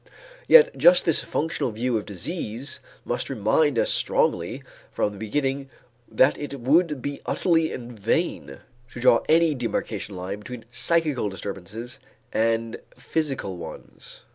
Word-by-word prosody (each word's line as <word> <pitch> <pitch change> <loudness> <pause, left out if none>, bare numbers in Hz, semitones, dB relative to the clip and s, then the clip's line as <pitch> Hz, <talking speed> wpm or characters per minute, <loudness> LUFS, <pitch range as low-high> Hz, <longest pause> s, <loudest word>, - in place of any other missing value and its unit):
Yet 485 +1 +7
just - - +5
this - - +2
functional 160 -4 -1
view 120 +2 -1
of 105 - -2
disease 120 - -4 0.3
must 120 - -2
remind 130 +4 +2
us - - +2
strongly - - 0 0.3
from 105 - -1
the 100 - -11
beginning 135 +4 -2 0.4
that 130 - +4
it 140 -2 -6
would 150 +2 +2
be 145 0 -4
utterly 165 -3 +2
in 120 -1 -7
vain 115 - -1 0.4
to - - -7
draw 120 -1 +5
any 165 0 +5
demarcation 115 -5 -3
line 95 +3 -5
between 115 +1 -9
psychical 150 -4 +1
disturbances 100 +5 -7 0.3
and 115 0 0 0.2
physical 130 - -2
ones. 80 -2 -10
125 Hz, 135 wpm, -25 LUFS, 110-150 Hz, 0.4 s, Yet